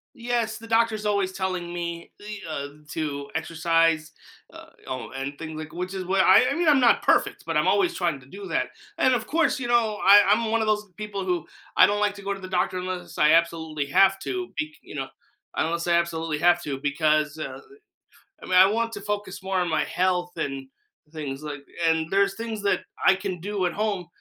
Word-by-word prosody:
Yes, 235 -2 -1
the 230 - -11
doctor's 225 -1 +1
always 200 -2 0
telling 185 -2 -3
me 170 -1 -5
the 210 0 -8
uh, 140 -2 -3 0.2
to 145 -3 -4
exercise, 165 -1 +1 0.4
uh, - - -12 0.2
oh, 130 -1 -5
and 135 +2 -5
things 160 0 -7
like 155 -1 -7
which 180 +2 -5
is 190 -1 -4
what 190 +1 +2
I 205 +9 +6
mean, 340 0 0
I'm 290 -3 +6
not 245 -2 +4
perfect, - - +2
but - - -3
I'm - - +2
always 365 -3 +3
trying 170 -6 -1
to - - -17
do 195 +8 -9
that, - - 0 0.3
and 260 - +4
of 235 -3 -1
course, 325 -2 +1
you 245 - -3
know, 230 -3 +2
I 205 +1 +8
I'm 220 +3 +3
one 230 0 +2
of 220 - -1
those 210 -1 0
people 210 -2 -4
who, 180 -3 -1 0.3
I - - +9
don't 205 0 0
like 205 -1 +1
to 200 - -11
go 200 0 -1
to 195 - -9
the 185 - -7
doctor 185 0 0
unless 185 0 -6
I 150 +1 +5
absolutely 160 -3 +1
have 195 +7 +4
to, 370 -1 -3
becau 155 0 -2
you - - -12
know, 135 -2 -3 0.5
unless 170 +1 -1
I 175 - +2
absolutely 165 -2 0
have 175 +1 +4
to, 140 -4 -4
because, 150 +1 +1
uh 155 - -6 0.8
I - - -9
mean, 185 - 0
I 185 +1 +8
want 230 +2 -1
to 205 - -6
focus 205 -1 -4
more 190 0 0
on 180 - 0
my 155 -2 +1
health 180 +2 0
and 135 -1 -4 0.4
things, 150 -3 -6
like 145 -2 -7 0.2
and 160 0 0
there's 195 +1 +2
things 225 -2 -4
that 200 - +1 0.2
I 190 - +7
can 190 -3 -5
do 200 0 -2
at 175 - -1
home 205 -5 -2
185 Hz, 215 wpm, -25 LUFS, 160-210 Hz, 0.8 s, I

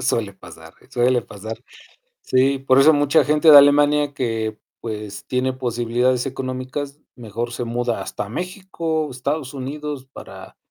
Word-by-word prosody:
Suele 115 -5 -1
pasar, 80 -3 -14 0.2
suele 125 0 +2
pasar. 110 +2 -8 0.6
Sí, 135 +1 +2
por 135 0 +3
eso 150 +4 +7
mucha 145 +1 +3
gente 150 +2 +4
de 145 - +11
Alemania 145 0 +4
que, 110 -4 -2 0.2
pues, 105 -3 -6
tiene 130 +1 0
posibilidades 120 +1 0
económicas, 135 +2 -5 0.2
mejor 120 0 -5
se 120 - -4
muda 120 0 -2
hasta 105 -1 -5
México 170 - -3
o - - -9
Estados 135 +2 -3
Unidos 140 0 -6
para - - -11
130 Hz, 140 wpm, -21 LUFS, 115-145 Hz, 0.6 s, de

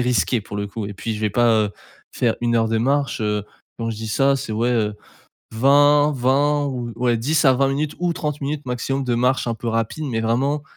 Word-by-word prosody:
risqué 125 -1 +1
pour 100 0 -8
le 100 0 -2
coup 105 +1 -6
et 100 - -7
puis 110 +3 -4
je 105 - -6
vais 105 -1 0
pas, 120 +4 +3 0.2
heu, - - -6 0.4
faire 115 -2 0
1 120 -1 +1
heure 115 -1 +2
de 115 - 0
marche, 140 +2 0
heu, 105 -1 -1 0.3
quand 115 -1 -2
je 115 - -3
dis 110 +1 -6
ça, 135 +5 +3
c'est 135 - -4
ouais, 115 +3 0
heu, 110 -3 0 0.6
vingt 145 +5 +4
vingt 145 +3 +2
ou 125 -3 -4
ouais 120 -1 +1
10 150 +8 +1
à 135 - +7
20 135 +1 +2
minutes 145 +2 -2
ou 175 -1 0
30 150 -2 -3
minutes 145 +1 -3
maximum 130 +2 -2
de 125 -2 0
marche 125 +2 +1
un 120 - -1
peu 115 +1 -5
rapide, 115 +7 -2
mais 115 -4 -2
vraiment 135 +6 0
125 Hz, 235 wpm, -21 LUFS, 115-140 Hz, 0.6 s, à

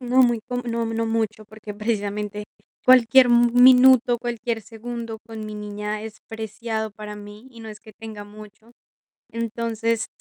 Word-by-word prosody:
No 250 +1 +3
muy, 240 -2 +2
co 250 - -3
no 235 -1 -2
no 225 0 -2
mucho, 225 -1 -2
porque, 215 0 -10
precisamente, 210 -1 -3 0.4
cualquier 255 0 +6
m 240 0 +4
minuto, 250 -1 +6
cualquier 235 -1 -3
segundo 230 0 -7
con 220 -1 -8
mi 215 - -7
niña 210 0 -5
es 220 0 -9
preciado 220 0 -4
para 210 +1 -9
mí, 205 +3 -12
y 235 -2 -14
no 225 - -9
es 210 -1 -10
que 215 - -15
tenga 215 -1 -9
mucho. 215 +2 -15 0.6
Entonces, 230 0 -2
225 Hz, 160 wpm, -23 LUFS, 215-235 Hz, 0.6 s, cualquier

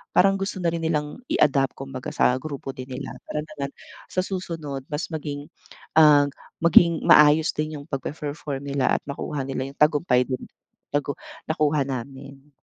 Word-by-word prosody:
parang 195 +1 +5
gusto 195 0 -3
na 170 - +2
rin 165 - -2
nilang 150 -2 -1
i-adapt 135 -2 +2
kumbaga 135 -1 -6
sa 125 +1 +3
grupo 140 -1 -6
din 130 -1 -8
nila. 130 +1 -6 0.2
Para 150 - -3
naman 150 -3 -5 0.4
sa 185 - -1
susunod 160 -8 -5
mas 150 +4 -4
maging, 145 -2 -5 0.5
ah, 145 -2 +7 0.4
maging 170 0 +6
maayos 150 +1 +6
din 155 0 -3
yung 145 - -15
pagpe-perform 145 0 -4
nila 140 -2 0
at - - -3
makuha 140 0 -4
nila 130 0 -3
yung - - -21
tagumpay 145 -4 +4
din. 130 0 -4 0.5
Tagu 145 0 0 0.4
nakuha 150 -2 +2
namin. 135 +2 -7
145 Hz, 155 wpm, -24 LUFS, 135-155 Hz, 0.5 s, ah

